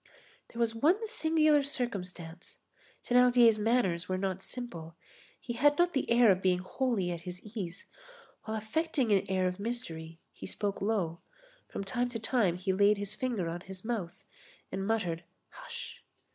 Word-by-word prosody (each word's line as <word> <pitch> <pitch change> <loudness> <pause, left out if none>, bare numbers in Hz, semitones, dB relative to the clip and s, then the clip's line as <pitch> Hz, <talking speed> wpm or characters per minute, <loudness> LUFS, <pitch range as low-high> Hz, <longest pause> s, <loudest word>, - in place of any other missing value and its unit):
There 235 - -10
was 230 -1 +2
one 335 - +2
singular 315 -6 +3
circumstance; 185 - -4 0.5
Thénardier's 245 -3 +5
manners 210 -6 +1
were 185 - 0
not 190 0 -2
simple; 170 -10 -7 0.4
he 240 - -5
had 290 +5 +4
not 350 0 +3
the 270 - -1
air 235 -2 +6
of 185 0 +1
being 185 -1 +3
wholly 195 0 -1
at 170 -1 -4
his 180 +1 -7 0.2
ease; 180 -4 -5 0.6
while 220 0 -2
affecting 260 +3 0
an 195 -2 +2
air 185 -1 +1
of 180 +1 -1
mystery, 165 -8 -4
he - - -8
spoke 200 +1 -2
low; 190 -6 0 0.5
from - - -4
time 245 +5 -1
to 235 -2 -4
time 220 -6 +2
he 190 +1 0
laid 200 +2 +4
his 205 0 -3
finger 230 -7 -2
on 170 +1 -4
his 190 +2 -10
mouth, 215 -8 -3 0.5
and 195 +1 -3
muttered, 180 -7 0 0.3
"hush!" - - -9
210 Hz, 160 wpm, -31 LUFS, 180-245 Hz, 0.6 s, air